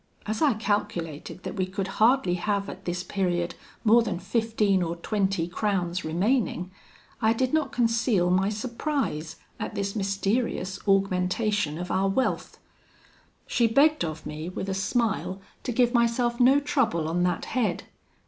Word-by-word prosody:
As 215 +1 -3
I 290 -7 +4
calculated 185 -6 -3
that - - -4
we 185 -2 -1
could 190 +1 -3
hardly 235 -5 +4
have 200 +2 -1
at 190 - -9
this 180 +1 -2
period 175 -2 -1 0.3
more 230 +2 +6
than 215 -6 -2
fifteen 210 0 +1
or 170 -1 -1
twenty 190 -1 -1
crowns 185 -1 -1
remaining, 185 +1 0 0.5
I 220 +1 +4
did 255 +3 -1
not 310 -4 +1
conceal 230 -6 +2
my 190 +2 +3
surprise 235 - -2 0.2
at - - -4
this 200 +1 -2
mysterious 200 -1 -1
augmentation 195 -2 +1
of 180 +1 -5
our 195 +1 +2
wealth. 260 +7 -1 0.9
She 235 - +2
begged 290 - +4
of 160 -1 -5
me, 155 +3 -5
with 190 +1 -5
a - - 0
smile, 195 -1 -1 0.2
to 250 - -3
give 245 +1 +2
myself 235 0 +2
no 260 +3 +6
trouble 240 - 0
on 170 +2 0
that 180 0 0
head. 220 -9 0
200 Hz, 150 wpm, -26 LUFS, 180-235 Hz, 0.9 s, more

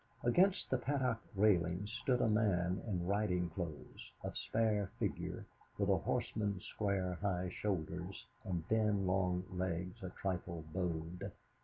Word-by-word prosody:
Against 180 +11 +4
the 130 - +3
Paddock 130 -3 +1 0.2
railings 95 -1 +3
stood 125 -2 +2
a - - +4
man 95 -4 +2
in 90 -5 0
riding 90 -3 +1
clothes, 85 -4 -6
of - - -4
spare 105 -3 +1
figure, - - -2 0.3
with - - +1
a - - +5
horseman's 100 -3 -1
square, 95 -4 -1
high 95 -3 0
shoulders, 90 -1 -2 0.2
and 85 -3 -2
thin 105 -3 +3
long 90 -1 +2
legs 90 -1 -2
a 95 - -4
trifle 85 -4 -3
bowed. 90 +1 -2
95 Hz, 135 wpm, -37 LUFS, 90-105 Hz, 0.3 s, a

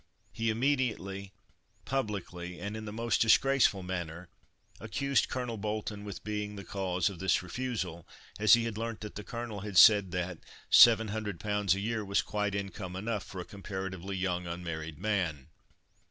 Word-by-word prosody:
He 115 0 -1
immediately, 110 -6 -1 0.5
publicly, 95 -8 -3
and 100 +1 -4
in 110 0 -6
the 105 - -5
most 115 +2 0
disgraceful 115 -3 +4
manner, 90 -1 -5 0.5
accused 140 +6 0
Colonel 125 -3 -3
Bolton 105 0 -3
with 100 -1 -7
being 105 -1 -3
the 100 - -7
cause 95 -3 -1
of 95 -4 -4
this 95 -1 +2
refusal, 90 -4 -4 0.3
as 110 +2 +8
he 120 - 0
had 115 -2 -3
learnt 115 -1 -4
that 105 - -6
the 105 - -7
Colonel 115 -2 -5
had 100 -2 -4
said 100 -2 +8
that 90 -1 -3 0.3
"700 110 -4 +6
pounds 105 -3 +1
a - - -3
year 110 +1 -1
was 100 0 +1
quite 105 -1 -1
income 95 -2 -5
enough 105 +1 -2
for 95 - -7
a - - -8
comparatively 95 -1 -5
young, 90 -2 -1
unmarried 85 -3 -5
man." 90 -9 -1
100 Hz, 160 wpm, -31 LUFS, 95-110 Hz, 0.5 s, as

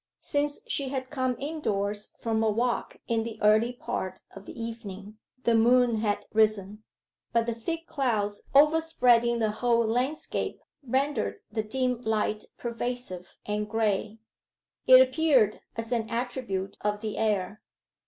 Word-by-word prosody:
Since 290 0 -1
she 275 -2 0
had 260 -1 -4
come 255 -3 0
indoors 210 -9 -2
from 225 -1 0
her 220 - +3
walk 240 +3 -1
in 230 -1 +1
the 220 -1 -6
early 215 +3 +4
part 190 -6 -5
of 195 0 -11
the - - -9
evening 215 -2 -7 0.2
the 235 - +3
moon 240 +1 +4
had 210 -1 -1
risen. 215 -1 +2 0.5
But 230 -1 +3
the 235 - -1
thick 330 +9 -4
clouds 215 -9 -1
overspreading 275 -6 +4
the 220 -2 +1
whole 235 +1 +2
landscape 250 +7 -1 0.2
rendered 275 - -1
the 220 0 -1
dim 250 +2 -1
light 215 -2 -1
pervasive 235 -6 -5
and 210 0 -2
grey: 215 -1 0 0.7
it 255 0 +10
appeared 260 -5 +4 0.2
as 225 +1 -4
an 230 -2 0
attribute 230 -5 -3
of 210 0 -1
the 215 -2 -4
air. 210 -2 0
230 Hz, 140 wpm, -28 LUFS, 210-255 Hz, 0.7 s, it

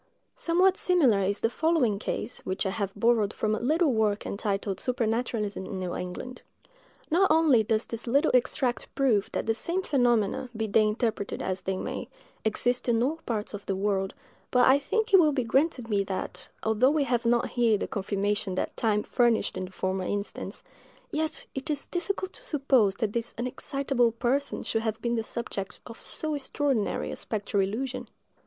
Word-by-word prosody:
Somewhat 365 +3 +3
similar 290 - +3
is 200 +2 0
the 225 - +2
following 300 -12 +2
case, 245 - -3
which 185 +2 -3
I 190 - 0
have 200 -1 -2
borrowed 220 -1 +3
from 215 -1 -1
a 215 - 0
little 305 +3 +2
work 215 -2 +1
entitled 200 -1 -2
"Supernaturalism 230 -4 -1
in 190 - -5
New 185 -1 -3
England." 180 +8 -6 0.7
Not 375 +4 +4
only 310 -7 +5
does 215 +1 0
this 230 +1 -6
little 280 +6 +3
extract 250 0 +1
prove 240 -8 +2
that - - -2
the 225 - +2
same 345 +11 -1
phenomena, 245 - +1
be 220 - 0
they 215 +1 +3
interpreted 215 -2 -2
as 185 0 -2
they 190 0 -2
may, - - -4 0.3
exist 245 +3 +2
in 230 0 +3
all 295 +5 0
parts 215 -3 -2
of 205 -1 -7
the 195 - 0
world, 195 -1 -1 0.3
but 250 -1 +4
I 270 +2 +6
think 445 +10 -1
it 385 - +10
will 305 -4 +4
be 260 -3 0
granted 265 +1 +1
me 205 -3 +1
that, 190 -1 -5
although 220 +4 +3
we 300 0 +2
have 245 -3 0
not 235 0 +2
here 235 -3 +3
the - - -3
confirmation 200 -1 -1
that - - -2
time 210 -2 +1
furnished 235 -2 +2
in 185 - -3
the 185 - -11
former 190 0 -2
instance, 205 +2 -4 0.5
yet 315 +1 -2
it 270 +2 -5
is 290 -2 -1
difficult 375 +1 -3
to - - -6
suppose 260 -9 +2
that 220 -4 -2
this 235 0 -3
unexcitable 250 0 0
person 270 +4 0
should 225 - -1
have 220 -1 -2
been 235 +1 -1
the 230 - +1
subject 220 -3 -5
of 230 - -10
so 310 -1 -2
extraordinary 275 -5 -1
a - - -4
spectral 205 -2 -1
illusion. 245 +7 -3
230 Hz, 185 wpm, -28 LUFS, 205-270 Hz, 0.7 s, it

